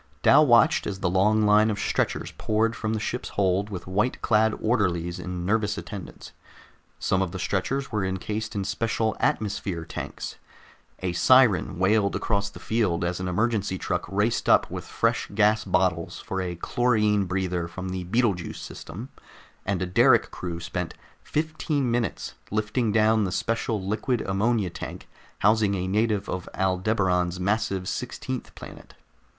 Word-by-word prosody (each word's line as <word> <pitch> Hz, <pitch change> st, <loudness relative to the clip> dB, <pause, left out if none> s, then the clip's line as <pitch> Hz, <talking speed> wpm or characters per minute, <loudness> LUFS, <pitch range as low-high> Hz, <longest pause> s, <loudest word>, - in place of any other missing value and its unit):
Dal 155 Hz, -, +7 dB
watched 120 Hz, -3 st, +5 dB
as 95 Hz, -2 st, -5 dB
the 90 Hz, -, +1 dB
long 105 Hz, +4 st, +3 dB
line 105 Hz, +1 st, +5 dB
of 105 Hz, -, -1 dB
stretchers -, -, -1 dB
poured 110 Hz, +1 st, +1 dB
from 110 Hz, 0 st, -2 dB
the -, -, -1 dB
ship's 125 Hz, +4 st, -3 dB
hold 100 Hz, +1 st, +2 dB
with 90 Hz, -4 st, -6 dB
white 105 Hz, +7 st, 0 dB
clad 110 Hz, 0 st, +3 dB
orderlies 90 Hz, -6 st, 0 dB
in 90 Hz, -1 st, -5 dB
nervous 105 Hz, 0 st, +1 dB
attendance. 100 Hz, -3 st, -8 dB, 0.7 s
Some 95 Hz, -, +1 dB
of 95 Hz, -3 st, -1 dB
the 95 Hz, -, -5 dB
stretchers 125 Hz, +9 st, -1 dB
were 105 Hz, -3 st, 0 dB
encased 105 Hz, +4 st, -3 dB
in 100 Hz, -, -1 dB
special 110 Hz, +3 st, -1 dB
atmosphere 95 Hz, -5 st, -1 dB
tanks; -, -, -6 dB, 0.7 s
a 90 Hz, -2 st, -1 dB
siren 100 Hz, -2 st, +4 dB
wailed 100 Hz, +2 st, +2 dB
across 100 Hz, -2 st, 0 dB
the -, -, -12 dB
field 100 Hz, -7 st, 0 dB
as 85 Hz, +1 st, -2 dB
an 90 Hz, -, -3 dB
emergency 100 Hz, 0 st, 0 dB
truck -, -, -2 dB
raced 105 Hz, +4 st, 0 dB
up -, -, +4 dB
with -, -, -5 dB
fresh -, -, 0 dB
gas 105 Hz, 0 st, +3 dB
bottles 90 Hz, -3 st, 0 dB
for 95 Hz, -, -3 dB
a 90 Hz, -1 st, -3 dB
chlorine 105 Hz, +1 st, +1 dB
breather 90 Hz, -2 st, -1 dB
from 90 Hz, +2 st, -6 dB
the 90 Hz, 0 st, -3 dB
Betelgeuse 100 Hz, -3 st, 0 dB
system, 105 Hz, +12 st, -8 dB, 0.6 s
and 95 Hz, -2 st, 0 dB
a -, -, 0 dB
derrick 90 Hz, -, +4 dB
crew 85 Hz, -2 st, -5 dB
spent 85 Hz, 0 st, -4 dB, 0.3 s
fifteen 155 Hz, -4 st, -1 dB
minutes 115 Hz, -4 st, -2 dB, 0.2 s
lifting 110 Hz, +2 st, 0 dB
down 110 Hz, 0 st, +3 dB
the 95 Hz, -, -1 dB
special 115 Hz, +3 st, -1 dB
liquid 110 Hz, +5 st, -1 dB
ammonia 100 Hz, 0 st, 0 dB
tank -, -, -8 dB, 0.4 s
housing 105 Hz, -1 st, +4 dB
a 95 Hz, -1 st, -2 dB
native 105 Hz, 0 st, +1 dB
of 90 Hz, -1 st, -4 dB
Aldebaran's 95 Hz, -2 st, +1 dB
massive 100 Hz, -1 st, 0 dB
sixteenth 125 Hz, +2 st, -5 dB
planet. -, -, -12 dB
100 Hz, 155 wpm, -26 LUFS, 90-110 Hz, 0.7 s, Dal